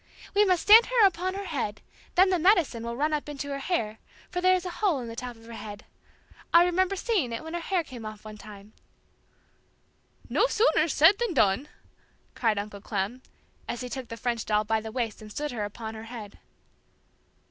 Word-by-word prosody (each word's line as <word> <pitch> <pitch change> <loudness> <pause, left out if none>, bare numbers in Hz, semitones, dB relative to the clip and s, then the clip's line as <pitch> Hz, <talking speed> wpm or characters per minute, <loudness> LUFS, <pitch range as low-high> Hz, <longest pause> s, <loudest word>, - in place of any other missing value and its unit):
"We 415 +1 +5
must 365 -3 +2
stand 445 +3 +8
her 485 -4 +5
upon 370 0 0
her 400 0 -5
head, 275 - -3 0.4
then 375 +1 +5
the 365 - +2
'medicine' 340 - +3
will 235 0 -4
run 305 +3 +1
up 300 0 -2
into 285 -1 -5
her 275 0 -3
hair, 230 -9 -2 0.3
for 360 - -2
there 370 0 +5
is 365 0 -3
a 360 - -3
hole 370 -10 +2
in 240 - -6
the 230 - -7
top 245 0 -6
of 225 0 -17
her 230 - -10
head. 210 -2 -8 0.7
I 340 +1 +7
remember 370 +2 +1
seeing 385 - 0
it 230 - -4
when 320 +1 -7
her 345 - -1
hair 350 0 0
came 255 -6 -10
off 215 0 -8
one 215 0 -9
time!" 210 0 -12 1.5
"No - - +2
sooner 445 -9 +3
said 325 +6 +5
than 470 -8 -1
done!" 220 +4 +3 0.7
cried 225 -4 +1
Uncle 205 0 -5
Clem, 205 +5 -3 0.5
as 240 - -4
he 250 - -5
took 260 -1 -6
the 230 - -7
French 235 -1 -2
doll 210 0 +1
by 220 +1 0
the 220 0 -7
waist 230 -3 -3
and 215 - -10
stood 295 +5 -3
her 220 -4 -3
upon 220 +2 -7
her 220 0 -8
head. 225 -3 -9
255 Hz, 210 wpm, -27 LUFS, 220-360 Hz, 1.5 s, stand